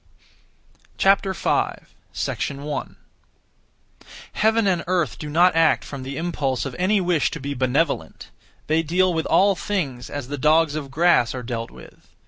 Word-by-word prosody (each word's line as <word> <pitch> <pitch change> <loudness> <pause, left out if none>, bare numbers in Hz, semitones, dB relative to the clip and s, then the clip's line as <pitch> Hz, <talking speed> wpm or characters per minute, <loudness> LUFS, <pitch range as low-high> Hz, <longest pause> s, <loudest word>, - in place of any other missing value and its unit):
5. 195 -1 +1 0.7
1. 145 0 -5 1.4
Heaven 220 +1 +2
and 180 -4 +1
earth 180 -3 0
do 150 - -6
not 175 +3 +4
act 165 -1 +3
from 140 -2 -7
(the 135 +2 -6
impulse 145 -7 -2
of) 135 - -5
any 200 +3 +2
wish 175 -5 +1
to 165 - -6
be 140 +1 -4
benevolent; 135 +4 -1 0.3
they 160 +1 +2
deal 180 +3 +1
with 160 -1 -1
all 200 +1 +4
things 165 -11 -3
as 145 -4 -5
the 145 +1 -5
dogs 155 +1 +3
of 150 -3 -5
grass 145 -5 +3
are 125 - -5
dealt 115 -1 -4
with. - - -16
160 Hz, 145 wpm, -22 LUFS, 140-180 Hz, 1.4 s, not